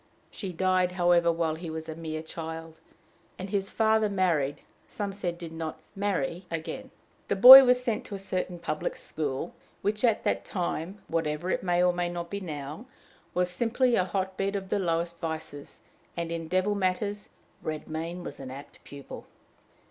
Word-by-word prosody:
She 195 -3 -5
died, 185 0 +1
however, 175 -1 +4
while 165 -1 0
he 165 +1 -6
was 160 0 -5
a 160 - -4
mere 155 -1 -5
child; 160 0 -7 0.6
and 190 +1 -6
his 195 -2 0
father 220 -1 +3
married, 170 -8 +1 0.3
some 200 -2 -4
said 180 -3 -3
did 170 -2 -8
not 160 -1 -5 0.2
marry 185 -3 -2
again. 165 -1 -5 0.4
The - - +1
boy 260 +7 +13
was 250 0 +3
sent 230 -3 -1
to 205 - -6
a - - -4
certain 185 -2 -3
public 170 -2 -3
school, 150 +1 -4 0.3
which 210 +2 0
at 230 -3 +3
that - - 0
time, 180 +1 -3
whatever 165 +2 -1
it - - 0
may 175 -1 +2
or 180 0 +4
may 175 0 -1
not 170 -1 -5
be 200 - -2
now, 155 - -6 0.5
was 180 0 +1
simply 240 +5 +2
a 185 - +3
hot 190 0 -2
bed 195 +1 -1
of 190 -1 -4
the 205 - +1
lowest 170 -1 -1
vices, 160 -3 -6 0.4
and 170 -1 -2
in 165 -1 -4
devil 185 +4 +1
matters 200 +1 -1 0.3
Redmain 160 +3 -4
was - - -8
an 135 -1 -7
apt 140 +2 -11
pupil. 140 -1 -10
175 Hz, 175 wpm, -28 LUFS, 160-195 Hz, 0.6 s, boy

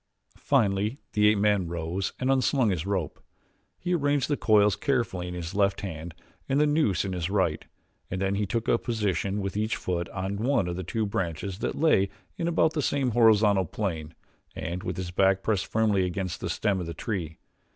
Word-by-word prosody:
Finally 105 -3 +1 0.2
the 105 0 +4
ape 105 0 +4
man 100 -3 +2
rose 85 +3 -3
and 130 +1 +1
un 135 -1 +3
slung 130 -5 +2
his 90 0 -2
rope. 95 -7 -2 0.6
He 180 0 -2
arranged 145 -4 +1
the 145 - +2
coils 105 -6 +4
carefully 115 - -1
in 90 - -5
his 85 0 -5
left 100 -1 +1
hand 85 -3 -6 0.3
and 135 +1 +2
the 150 - +5
noose 145 - +2
in 95 - -3
his 90 -1 -2
right, 95 -6 0 0.5
and 95 - -3
then 95 0 0
he 100 0 -1
took 115 +2 -2
a 115 - +3
position 105 -3 -1
with 95 0 -4
each 110 +2 0
foot 85 -1 -3
on 95 +1 -3
one 120 -3 +1
of 90 +1 -3
two 110 +1 -1
branches 95 0 -3
that - - -2
lay 100 -11 +4 0.3
in 170 - -2
about 165 -1 +2
the 150 - 0
same 135 -2 0
horizontal 105 -4 +4
plane 80 -4 -4 0.4
and 85 +2 -4
with 90 -1 -4
his 90 -1 -4
back 95 +1 +2
pressed 105 -4 0
firmly 105 -4 +2
against 90 0 -3
the - - -3
stem 100 -2 0
of 90 - -4
the 85 - -6
tree. 85 -6 -4
100 Hz, 200 wpm, -27 LUFS, 90-115 Hz, 0.6 s, the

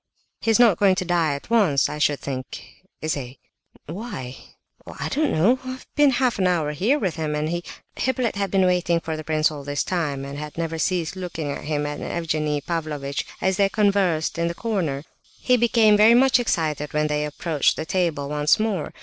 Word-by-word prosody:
"He's 225 -1 +2
not 225 -8 +5
going 195 -2 +4
to 185 -1 -2
die 165 -4 +1
at 140 - -10
once, 185 - +3
I 150 - -6
should 145 -1 +2
think, 135 +6 -7 0.2
is 155 - 0
he?" 130 -2 -6 0.5
"Why?" 165 - -6 0.5
"Oh, - - -10
I - - -2
don't 305 0 0
know. 220 +12 +3
I've 255 0 -7
been 295 -1 +5
half 250 -4 +1
an 185 - +3
hour 165 -5 +1
here 210 - +1
with 185 - -2
him, 155 -2 -2
and 150 +1 -1
he—" 175 +1 -2 0.3
Hippolyte 255 -3 -1
had 200 -1 -1
been 190 0 +3
waiting 175 -2 +2
for 160 -1 -4
the 155 - -6
prince 155 0 +1
all 145 -2 -7
this 145 0 -2
time, 145 -7 -2
and 140 +1 -7
had 150 0 -8
never 165 -1 -3
ceased 175 -1 -1
looking 170 -5 -4
at - - -6
him 150 -1 -1
and 145 0 -4
Evgenie 155 -3 -1
Pavlovitch 150 -4 -3
as 190 0 +1
they 200 -1 +3
conversed 195 -7 +1
in 170 - +1
the 170 - -3
corner. 170 -12 -2 0.4
He 250 - +3
became 225 -1 +5
much 260 0 +4
excited 155 - -1
when 150 0 +1
they 150 0 0
approached 150 0 0
the 155 - -4
table 165 -6 -1
once 150 +4 +2
more. 210 -7 -2
165 Hz, 200 wpm, -23 LUFS, 150-200 Hz, 0.5 s, not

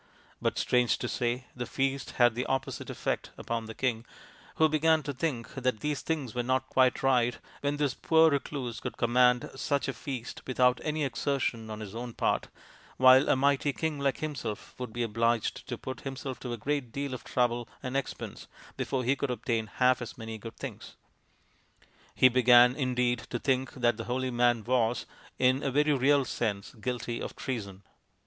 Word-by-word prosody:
But, - - 0
strange 125 -1 +2
to - - -3
say, 125 +1 -1
the 125 -1 -4
feast 135 0 -1
had 120 -2 +4
the 125 +2 -3
opposite 135 -1 -2
effect - - -2
upon 115 -1 -3
the 110 - -8
king, 120 -4 -1 0.5
who 160 - +5
began 155 +1 +3
to 145 - -3
think 130 -4 -3
that 130 -4 -1
things 150 -3 -2
were 125 - 0
not 130 +1 0
quite 130 -1 +3
right 125 -2 +3 0.2
when 145 0 -1
this 145 -2 +1
poor 160 +2 +4
recluse 135 -4 -3
could - - -6
com 120 0 0
mand 125 -1 +4
such 140 +1 -1
a 135 - -1
feast 125 -1 -6
without 125 -1 +3
any 155 0 -1
exertion 125 -3 -1
on 110 0 -6
his 105 -2 -7
own 120 +1 -5
part, - - 0 0.5
while 130 +2 +7
a - - +5
mighty 140 +1 +2
king 160 -1 -2
like 140 -1 0
himself 130 -9 -4
would 125 -3 -5
be 120 +1 -2
obliged 115 0 0
to - - -4
put 130 - -7
himself 135 -1 -5
to 125 - -5
a 120 - -3
great 135 +1 -2
deal 140 0 -3
of 130 - -6
trouble 120 -1 0
and 130 0 -4
expense 140 - -4 0.3
before 130 -1 -1
he 130 +3 +2
could 140 0 -2
obtain 115 -2 -1
half 125 +3 +2
as 120 - -7
many 110 -1 -6
good 115 +2 -9
things. - - -8 1.2
He 130 - +7
began, 125 0 +6
indeed, 125 -3 +1
to 120 - -2
think 130 +1 0
that 120 -3 +1
the 115 - -5
holy 130 +1 -1
man 120 -2 +2
was, 120 -1 +1 0.3
in 130 +1 +3
a 140 - 0
very 150 +3 +3
real 140 +1 +3
sense, 105 -5 -3
guilty 120 0 -4
of - - -5
treason. 100 -7 -5
125 Hz, 185 wpm, -29 LUFS, 120-135 Hz, 1.2 s, while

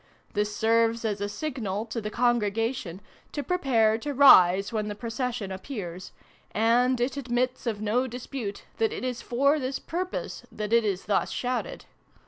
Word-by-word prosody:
This 210 0 -1
serves 230 +1 +2
as 205 -2 -1
a 205 - -1
signal, 220 -6 -3
to 230 0 -4
the 210 - -4
Congregation, 225 -4 0 0.3
to 290 - -3
prepare 235 -10 +2
to 290 +4 -4
rise 195 -7 +7
when 215 -1 -1
the 210 - -4
procession 230 -1 -3
appears: 190 -3 -6 0.4
and 240 +4 +3
it 250 +4 -1
admits 250 -1 -1
of 215 -3 -2
no 235 +5 +1
dispute 245 -4 -6
that 225 -1 +1
it - - -5
is 250 -2 -3
for 280 +5 +2
this 265 0 -2
purpose 365 +2 -4
that 210 +1 -4
it 235 0 +5
is 195 -3 -2
thus 205 -1 +1
shouted. 255 - -3
230 Hz, 160 wpm, -27 LUFS, 210-255 Hz, 0.4 s, rise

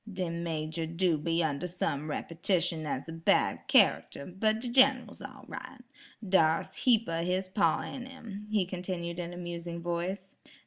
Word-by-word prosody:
"De 185 -3 -2
major 165 -1 -3
do 170 +1 +1
be 165 +3 0
under 150 +2 -1
some 155 -4 -2
repetition 165 0 0
as 135 0 -3
a - - -6
bad 165 0 +2
character, 140 - +3
but 215 +4 0
de 245 - -4
Gin'ral's 260 +1 +4
all - - -10
right. - - -8 0.5
Dar's 165 -4 +3
heap 230 -3 +3
o' 165 0 -1
his 185 +2 0
paw 195 +2 +2
in 255 -1 -6
'im," 215 -6 -9
he 210 -3 +2
continued 175 -1 -4
in 175 0 -4
a 175 - -8
musing 170 -1 -5
voice. 175 +3 -3
175 Hz, 165 wpm, -30 LUFS, 165-195 Hz, 0.5 s, Gin'ral's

